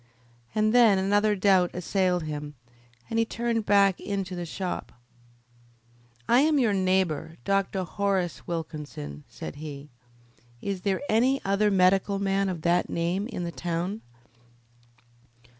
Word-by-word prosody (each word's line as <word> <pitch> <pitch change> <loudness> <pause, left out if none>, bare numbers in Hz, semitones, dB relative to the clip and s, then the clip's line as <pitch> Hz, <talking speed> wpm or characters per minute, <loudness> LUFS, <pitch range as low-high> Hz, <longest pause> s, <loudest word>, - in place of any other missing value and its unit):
And 215 0 +2
then 230 -5 +6
another 205 +2 +2
doubt 185 -2 +4
assailed 180 -1 0
him, 150 -1 -5 0.5
and 225 - -1
he - - +4
turned 230 -1 -2
back 200 -2 +4
into 195 -2 -3
the 175 -1 -5
shop. 185 +2 -4 1.4
"I 240 - +5
am 300 +2 +3
your 235 -6 +3
neighbour, 185 -5 0
Dr. 195 -1 0
Horace 190 -2 -2
Wilkinson," 150 - -6
said 80 - -8
he. 145 -1 -8 0.7
"Is 195 +2 -4
there 190 0 0
any 255 +5 +3
other 200 +2 +2
medical 195 +1 +3
man 195 0 0
of 170 -4 -5
that 175 +1 +2
name 175 +5 -1
in 225 -7 -5
the 170 - -3
town?" 175 +5 -3
190 Hz, 130 wpm, -27 LUFS, 175-205 Hz, 1.4 s, then